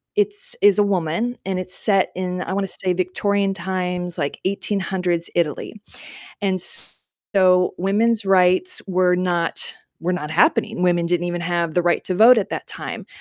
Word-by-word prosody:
it's 415 -1 0
is 205 -2 +6
a 205 - +5
woman, 200 +5 -1
and 190 -1 -2
it's 185 0 -6
set 195 -2 +1
in, 180 0 -3
I - - -4
wanna 195 0 -1
say 185 0 -2
Victorian 195 +2 0
times, 180 -1 -3
like 145 -2 -3
1800s 190 -3 -1
Italy. 165 -5 -1 0.7
And 190 -2 0 0.7
so 180 -2 +4
women's 210 +4 +1
rights 190 - +3
were 180 -1 +3
not 175 -2 -1 0.3
were 175 +3 -1
not 150 -4 -4
happening, 175 +1 +2
women 175 -1 +2
didn't 175 0 0
even 175 0 -3
have 170 -1 -1
the 175 - +2
right 175 0 +1
to 185 - -2
vote 235 +5 +8
at 200 - -2
that - - -4
time. - - -7
185 Hz, 165 wpm, -21 LUFS, 175-195 Hz, 0.7 s, vote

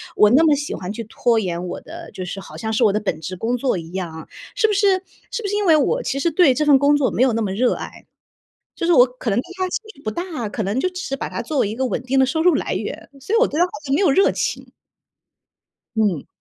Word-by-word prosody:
我 210 - +6
那 270 +8 +5
么 300 -2 +5
喜 290 +1 -4
欢 185 +2 -5
去 230 - -5
拖 230 +2 +1
延 180 -3 -3
我 175 - -6
的， 335 0 -10
就 185 - -6
是 185 +2 -6
好 - - -11
像 220 -1 -4
是 220 +2 +1
我 210 -3 +4
的 210 - +1
本 190 -7 -3
职 185 +3 -6
工 230 +6 -1
作 250 -4 0
一 165 0 -10
样 180 -4 -4
啊， 160 - -9 0.3
是 - - +3
不 425 - 0
是 390 -2 +2 0.3
是 - - -3
不 415 - -3
是 410 - -1
因 415 0 0
为 325 -3 +6
我 295 -3 +1
其 275 - -2
实 335 - +1
对 320 -4 +5
这 300 - 0
份 290 -2 +6
工 290 +1 +5
作 280 -3 +1
没 - - -1
有 260 - +3
那 225 - 0
么 205 -3 -1
热 245 +5 +2
爱， - - -9 0.7
就 335 - -3
是 350 - +4
我 245 -3 +7
可 250 -1 -7
能 200 - +1
对 245 - -1
它 375 - 0
兴 - - -2
趣 280 - -19
不 215 - -2
大， 330 - -4
可 215 +2 -4
能 200 +5 -1
就 370 - +1
只 365 0 -7
是 275 - -3
把 - - -4
它 - - -4
作 305 - -3
为 210 - +2
一 210 - -4
个 260 - -1
稳 245 - -2
定 260 +1 0
的 265 - +6
收 320 +5 -1
入 355 -1 +5
来 - - -1
源， - - -5
所 390 +11 -3
以 - - +5
我 - - +5
对 300 - -4
它 - - +6
好 - - -14
像 270 -1 0
没 295 - +2
有 385 - +4
热 385 +9 +4
情。 - - -3 1.2
嗯。 205 -9 0
260 Hz, 320 characters per minute, -21 LUFS, 210-330 Hz, 1.2 s, 我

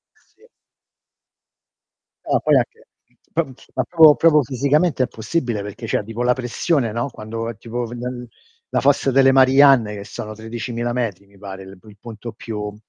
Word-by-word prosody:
Sì. 460 - -28 1.8
No, - - +2
poi - - +2
anche - - -3 0.5
po 165 - +2 0.3
ma - - +1
proprio- 160 -4 +6
proprio 155 -2 +4
fisicamente 140 +3 +1
è - - -1
impossibile 120 -1 -3
perché 105 +4 -8
c'è 110 - -1
tipo 115 +3 -5
la 125 0 +3
pressione, 125 0 -1
no, 120 +5 -2
quando 115 0 -6
tipo 120 +2 -5
la 120 +1 -4 0.6
la - - 0
Fossa 140 0 +2
delle 135 0 +5
Marianne 135 -4 +5
che 100 - -7
sono 110 +1 -7
13000 120 +2 -5
metri 110 -6 -3
mi 100 0 -22
pare, 95 -1 -9
il 95 0 -13
p 110 - -22
punto 115 0 -9
più 105 -2 -6
120 Hz, 160 wpm, -20 LUFS, 110-135 Hz, 1.8 s, proprio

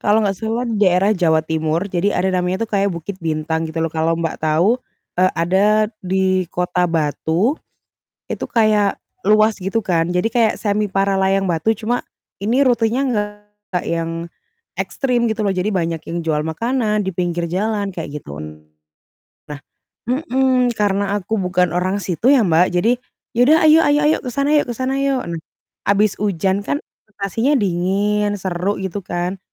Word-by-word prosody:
kalau 210 +2 +3
nggak 195 -2 -1
salah 225 +2 -2
di 230 -4 -2
daerah 190 0 +3
Jawa 165 -6 +2
Timur 160 +1 -1
jadi 185 +3 0
ada 190 - +1
namanya 185 +2 0
tuh 225 - -4
kayak 200 -1 +1
Bukit 185 +4 -6
Bintang 160 0 -2
gitu 160 +1 -3
loh 165 - -1
kalau 160 0 0
Mbak 165 -1 -3
tahu, 165 +10 +2 0.4
eee, 185 0 +4
ada 205 +5 +2
di 185 -1 0
kota 180 0 +1
Batu. 165 - 0 0.7
Itu - - -3
kayak 215 -3 +2 0.2
luas 215 +1 +4
gitu 195 +5 -1
kan, 170 -4 +1
jadi 180 +4 +1
kayak 225 -2 +2
semi 210 0 0
Paralayang 195 0 +1
Batu, 170 +7 +1
cuma 235 +4 -1 0.4
ini 235 +7 +2
rutenya 240 +1 +2
nggak 210 -5 -4
yang 165 0 -3 0.5
ekstrim 245 -3 0
gitu 220 0 -2
loh, 200 - +2
jadi 185 +2 -1
banyak 170 -5 -1
yang 170 0 -3
jual 155 -2 +1
makanan 215 +4 0
di 190 - -1
pinggir 175 -1 -1
jalan 200 +2 -1
kayak 160 -4 -6
gitu, 75 - -8
nah 75 0 -13 1.4
mhm, 255 -1 +3
karena 200 -1 +1
aku 205 +2 -2
bukan 180 -2 +1
orang 185 +3 0
situ 200 +4 0
ya 265 -7 +5
Mbak, 170 +1 +4
jadi, 220 +7 +3 0.4
"Ya 235 - -3
udah 310 +2 +6
ayo 310 +1 +7
ayo 290 0 +4
ayo, 305 - +4
ke 255 - -5
sana 280 +4 0
yuk 295 -4 +2
ke 240 - -3
sana 265 +1 -1
yuk," 275 -2 0 0.6
habis 205 0 +3
hujan 195 -1 0
kan 285 +7 -1 0.3
situasinya 215 +7 -1
dingin, 205 +1 0
seru 190 +2 -2
gitu 190 +1 -3
kan. 180 +1 -3
195 Hz, 165 wpm, -19 LUFS, 175-220 Hz, 1.4 s, ayo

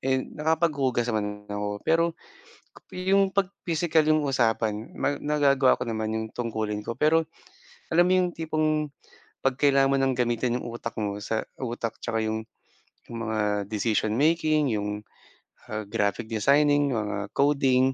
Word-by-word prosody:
eh, 130 0 +2
nakapaghugas 150 -6 0
naman 105 -1 -3
ako 105 0 -3
pero 165 +1 +3 0.9
'yong 190 +1 +2
'pag 195 -2 +2 0.2
pisikal 160 -1 +2
'yong 155 -1 +3
usapan 110 -3 0
ma 145 - 0
nagagawa 140 -3 +3
ko - - -1
naman 110 -1 -2
'yong 110 0 -2
tungkulin 110 -3 -2
ko. 115 - -3
Pero 160 +1 +3 0.7
alam 175 +1 +5
mo - - +4
'yong 180 -1 +1
tipong, 155 -1 0 0.6
'pag 135 -1 +2
kailangan 140 -1 +4
mo - - +3
ng 135 -1 +2
gamitin 120 0 +1
'yong - - -7
utak 115 0 -5
mo 100 -1 -2
sa 110 -1 -1 0.2
utak 120 -2 -3
'tsaka 115 - -1
'yong 110 0 -2 0.7
'yong 115 - -6
mga 110 0 -1 0.3
decision 110 0 0
making, 155 0 +2
'yong, 105 0 -2 0.7
ah, 110 0 -3
graphic 105 +1 -1
designing, 140 +4 +3
mga 105 -2 -3
coding, 135 -2 +3
130 Hz, 145 wpm, -26 LUFS, 110-150 Hz, 0.9 s, alam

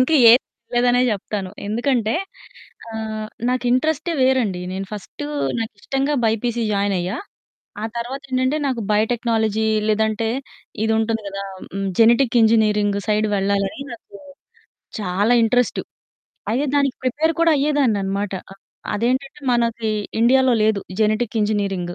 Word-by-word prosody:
ఇంకేది 255 -4 +7 0.4
వినలేదనే 245 +1 +3
చెప్తాను. 200 -2 -3 0.2
ఎందుకంటే 230 +1 0 0.8
ఆహ్, 220 -1 -4 0.2
నాకు 250 0 0
ఇంట్రెస్టే 315 +6 +1
వేరండి. 250 -8 +2
నేను 195 +1 -4
ఫస్ట్ 210 +7 -8 0.4
నాకు 225 -1 -3
ఇష్టంగా 275 +2 -1
బైపీసీ 230 +2 0
జాయిన్ 200 0 +1
అయ్యా. 180 +5 -2 0.7
ఆ - - -2
తర్వాత 255 +4 -4
ఏంటంటే, 255 +3 +1
నాకు 255 -4 -1
బయోటెక్నాలజీ 220 -1 +1 0.2
లేదంటే 220 +1 +1 0.6
ఇది 220 - +1
ఉంటుంది 225 0 0
కదా! 195 0 -5 0.3
హ్మ్, 195 0 -2
జెనెటిక్ 235 +2 +4
ఇంజినీరింగ్ 210 -2 +3
సైడ్ 215 0 +2
వెళ్ళాలని, 200 +4 -1
నాకు 220 -3 -12 0.8
చాలా 200 +4 +1
ఇంట్రెస్ట్. 245 +2 +1 0.7
అయితే, 270 +5 0
దానికి 280 -2 +1
ప్రిపేర్ 300 +6 +1
కూడా 335 -1 +5
అయ్యేదాన్నన్నమాట. 210 -9 0 0.2
అ - - -11 0.4
అదేంటంటే, 260 +6 -1
మనకి 235 -2 0 0.3
ఇండియాలో 260 +1 +4
లేదు 215 -2 +1 0.2
జెనెటిక్ 215 +2 0
ఇంజినీరింగ్. 195 -4 -1
225 Hz, 120 wpm, -21 LUFS, 210-250 Hz, 0.8 s, ఇంకేది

